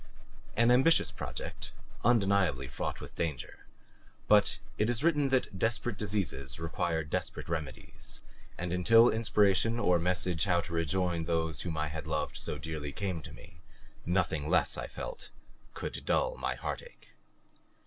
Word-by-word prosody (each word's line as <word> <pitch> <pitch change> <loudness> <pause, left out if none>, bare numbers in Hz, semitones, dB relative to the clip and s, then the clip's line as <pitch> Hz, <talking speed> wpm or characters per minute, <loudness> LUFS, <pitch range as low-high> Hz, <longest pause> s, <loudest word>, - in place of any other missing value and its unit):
An 115 +2 +5
ambitious 135 +7 +5
project, - - -6 0.3
undeniably 100 - +3
fraught - - -4
with - - -9
danger; 75 -7 -4 0.6
but 105 -1 +5 0.2
it 105 +2 +2
is 120 +2 -1
written 150 -4 +3
that 130 -7 0
desperate 115 0 0
diseases 95 -11 -2
require 80 0 -1
desperate 70 - -4
remedies, 75 -6 -5 0.4
and 85 0 -3
until 115 +6 +6
inspiration 110 0 +3
or 90 -6 +3
message 90 -1 +1
how 90 -3 +3
to 85 0 -8
rejoin 85 +1 0
those 80 -2 0
whom 80 -4 -3
I 75 -1 -1
had 80 0 -6
loved 75 -1 -1
so - - -3
dearly 75 -3 -5
came 90 0 -3
to - - -10
me, 80 - -14 0.4
nothing 85 -4 0
less, 90 - +3
I - - -4
felt, - - -7 0.5
could - - -5
dull - - +1
my - - -2
heartache. 485 0 -7
90 Hz, 145 wpm, -31 LUFS, 80-110 Hz, 0.6 s, until